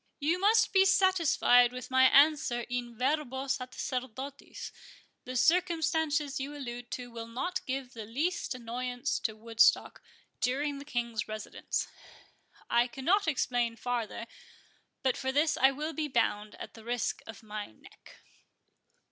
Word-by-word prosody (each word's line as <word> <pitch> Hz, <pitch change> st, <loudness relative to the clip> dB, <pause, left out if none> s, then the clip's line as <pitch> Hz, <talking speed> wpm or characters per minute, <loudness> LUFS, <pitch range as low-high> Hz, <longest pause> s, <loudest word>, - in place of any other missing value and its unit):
"You 320 Hz, +5 st, +1 dB
must 430 Hz, +2 st, +4 dB
be 385 Hz, -1 st, +6 dB
satisfied 335 Hz, -11 st, +4 dB
with 250 Hz, 0 st, -8 dB
my 260 Hz, 0 st, +6 dB
answer 280 Hz, -3 st, +5 dB
in 240 Hz, -1 st, -4 dB
verbo 265 Hz, 0 st, -1 dB
sacerdotis—the 255 Hz, 0 st, -6 dB
circumstances 320 Hz, -2 st, +2 dB
you 280 Hz, +2 st, -5 dB
allude 245 Hz, -3 st, -7 dB
to 245 Hz, -1 st, -6 dB
will 230 Hz, -1 st, -7 dB
not 270 Hz, +11 st, -3 dB
give 260 Hz, -1 st, -3 dB
the 225 Hz, -2 st, -7 dB
least 295 Hz, +5 st, -1 dB
annoyance 250 Hz, +3 st, -3 dB
to 220 Hz, -, -2 dB
Woodstock 225 Hz, +1 st, +2 dB, 0.4 s
during 280 Hz, +3 st, 0 dB
the 280 Hz, -, -9 dB
King's 235 Hz, -5 st, -2 dB
residence. 215 Hz, 0 st, -4 dB, 0.8 s
I 235 Hz, +1 st, +3 dB
cannot 325 Hz, -, +1 dB
explain 245 Hz, -5 st, 0 dB
farther; 235 Hz, -1 st, -3 dB, 0.8 s
but 260 Hz, -2 st, +1 dB
for 265 Hz, 0 st, -1 dB
this 300 Hz, +4 st, +2 dB
I 265 Hz, -, +5 dB
will 300 Hz, +4 st, -4 dB
be 310 Hz, -1 st, -2 dB
bound, 215 Hz, -5 st, 0 dB
at -, -, -9 dB
the 225 Hz, -, -13 dB
risk 240 Hz, +1 st, -2 dB
of 225 Hz, 0 st, -10 dB
my 210 Hz, -1 st, -5 dB
neck." 110 Hz, -, -18 dB
260 Hz, 135 wpm, -30 LUFS, 240-295 Hz, 0.8 s, be